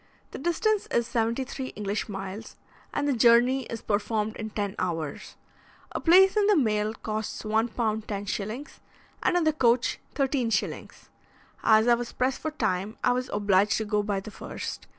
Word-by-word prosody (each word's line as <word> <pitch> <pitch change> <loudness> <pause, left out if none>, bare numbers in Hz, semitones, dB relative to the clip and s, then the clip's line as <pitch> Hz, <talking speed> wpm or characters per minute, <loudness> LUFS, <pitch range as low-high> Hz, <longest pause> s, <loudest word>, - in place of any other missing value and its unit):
The - - -7
distance 385 +7 0
is 235 - +1
seventy 230 +2 0
three 260 0 -6
English 210 +1 -3
miles, 195 +2 -6 0.4
and 290 0 -1
the 285 - +2
journey 240 +3 +4
is 230 -1 -7
performed 215 +1 -1
in 220 -1 -5
ten 205 -2 -3
hours. 165 -5 -3 0.6
A - - -3
place 380 +4 +6
in 415 -1 +3
the 420 - +5
mail 215 -4 +1
costs 215 0 -4
1 220 +2 +2
pounds 220 -2 -2
10s., 210 +5 -4 0.4
and 355 - +2
in 350 - +2
the 315 -1 +3
coach 240 -4 +2 0.2
13s. 265 -5 -1 0.5
As 220 +1 +5
I 240 - +6
was 235 0 -2
pressed 255 0 0
for 315 - -1
time, 215 -7 -2
I 250 - +4
was 250 +1 -1
obliged 200 0 +2
to 220 - -2
go 210 0 +1
by 205 -1 -1
the 210 +2 -9
first. - - -7
225 Hz, 170 wpm, -27 LUFS, 210-260 Hz, 0.6 s, place